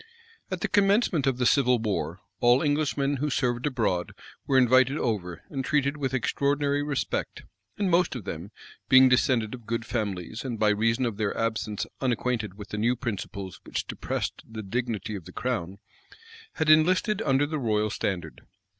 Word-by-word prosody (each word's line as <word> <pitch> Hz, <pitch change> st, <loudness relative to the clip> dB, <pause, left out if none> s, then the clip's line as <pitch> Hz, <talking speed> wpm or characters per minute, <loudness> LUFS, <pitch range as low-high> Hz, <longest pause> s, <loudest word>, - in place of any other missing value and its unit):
At -, -, -4 dB
the -, -, +1 dB
commencement 200 Hz, -, +2 dB
of 130 Hz, -2 st, +1 dB
the 125 Hz, -, 0 dB
civil 125 Hz, -1 st, +4 dB
war, 95 Hz, -6 st, -2 dB, 0.2 s
all 120 Hz, +3 st, +4 dB
Englishmen 145 Hz, -1 st, +1 dB
who 150 Hz, +3 st, -1 dB
served 125 Hz, -1 st, 0 dB
abroad 110 Hz, -10 st, -1 dB, 0.3 s
were 135 Hz, -, +3 dB
invited 130 Hz, +2 st, +5 dB
over, 95 Hz, -, -2 dB
and 135 Hz, -2 st, -2 dB
treated 140 Hz, 0 st, +1 dB
with 135 Hz, -3 st, -2 dB
extraordinary 140 Hz, +2 st, +1 dB
respect; 145 Hz, -2 st, -3 dB, 0.3 s
and 205 Hz, -, 0 dB
most 175 Hz, -3 st, +3 dB
of 120 Hz, -, -5 dB
them, 85 Hz, +2 st, -6 dB, 0.4 s
being 130 Hz, 0 st, +8 dB
descended 125 Hz, -3 st, +2 dB
of 120 Hz, -4 st, -10 dB
good 115 Hz, -1 st, -2 dB
families, 110 Hz, -2 st, -3 dB
and 125 Hz, -4 st, -4 dB
by 110 Hz, 0 st, +3 dB
reason 115 Hz, +4 st, +2 dB
of 115 Hz, -4 st, -3 dB
their 105 Hz, -2 st, -1 dB
absence 110 Hz, -2 st, -1 dB, 0.2 s
unacquainted 120 Hz, -5 st, -1 dB
with 105 Hz, -1 st, -10 dB
the 105 Hz, -, -4 dB
new 120 Hz, +3 st, +2 dB
principles 100 Hz, -5 st, -5 dB
which -, -, -3 dB
depressed -, -, -4 dB
the 110 Hz, -1 st, -8 dB
dignity 110 Hz, 0 st, -3 dB
of 95 Hz, -5 st, -6 dB
the 90 Hz, -, -10 dB
crown, 100 Hz, -5 st, -3 dB, 0.8 s
had 160 Hz, -4 st, -1 dB
enlisted 185 Hz, +7 st, +4 dB
under 135 Hz, -5 st, +2 dB
the 155 Hz, +1 st, -3 dB
royal 110 Hz, -4 st, 0 dB
standard. 95 Hz, -3 st, -3 dB
125 Hz, 170 wpm, -27 LUFS, 105-140 Hz, 0.8 s, being